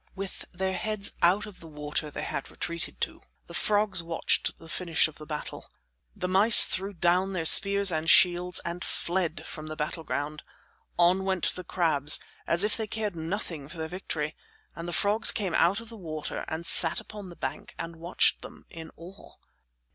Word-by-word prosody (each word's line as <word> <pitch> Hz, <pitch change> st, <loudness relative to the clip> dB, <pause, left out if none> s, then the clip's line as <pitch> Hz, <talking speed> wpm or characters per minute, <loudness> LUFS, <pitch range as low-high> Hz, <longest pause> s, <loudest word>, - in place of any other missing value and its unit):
With 195 Hz, -1 st, -7 dB
their 190 Hz, +1 st, -3 dB
heads 210 Hz, +2 st, 0 dB
out 185 Hz, +5 st, +3 dB
of 210 Hz, -3 st, -13 dB
the 165 Hz, -, -12 dB
water 150 Hz, 0 st, -5 dB
they -, -, -6 dB
had -, -, -5 dB
retreated 170 Hz, 0 st, -6 dB
to, -, -, -4 dB, 0.2 s
the -, -, -13 dB
frogs 205 Hz, -3 st, +1 dB
watched 165 Hz, 0 st, -1 dB
the 165 Hz, -, -14 dB
finish 165 Hz, -1 st, +1 dB
of 155 Hz, -, -14 dB
the 150 Hz, -, -11 dB
battle. 150 Hz, -1 st, -7 dB, 0.5 s
The 185 Hz, -3 st, -4 dB
mice 200 Hz, +5 st, +8 dB
threw 195 Hz, +2 st, -2 dB
down 180 Hz, +2 st, +1 dB
their 170 Hz, -3 st, -3 dB
spears 200 Hz, +2 st, +7 dB
and 160 Hz, 0 st, -2 dB
shields 180 Hz, -2 st, +4 dB
and 170 Hz, +1 st, -5 dB
fled 175 Hz, -2 st, -3 dB
from 155 Hz, 0 st, -8 dB
the 155 Hz, -, -6 dB
battleground. 150 Hz, -1 st, -4 dB, 0.6 s
On 175 Hz, +2 st, +3 dB
went 190 Hz, -2 st, -1 dB
the 180 Hz, -, -8 dB
crabs 155 Hz, -6 st, +3 dB, 0.3 s
as 170 Hz, +3 st, +1 dB
if 210 Hz, -, 0 dB
they 220 Hz, -1 st, -4 dB
cared 210 Hz, -2 st, -4 dB
nothing 165 Hz, -3 st, -6 dB
for 165 Hz, -, -10 dB
their 160 Hz, 0 st, -4 dB
victory, 160 Hz, -3 st, -5 dB, 0.4 s
and 165 Hz, +2 st, -7 dB
the -, -, -4 dB
frogs 205 Hz, +6 st, +3 dB
came 195 Hz, -5 st, -3 dB
out 185 Hz, +5 st, +2 dB
of 230 Hz, -1 st, -12 dB
the 230 Hz, -, -11 dB
water 155 Hz, -5 st, -6 dB
and 160 Hz, +1 st, -5 dB
sat 165 Hz, -1 st, +6 dB
upon 205 Hz, -3 st, -10 dB
the 175 Hz, -, -12 dB
bank 135 Hz, -4 st, -7 dB
and 165 Hz, 0 st, -7 dB
watched 170 Hz, +2 st, +1 dB
them -, -, -13 dB
in 160 Hz, -1 st, -10 dB
awe. 180 Hz, +4 st, -14 dB
175 Hz, 185 wpm, -27 LUFS, 160-195 Hz, 0.6 s, mice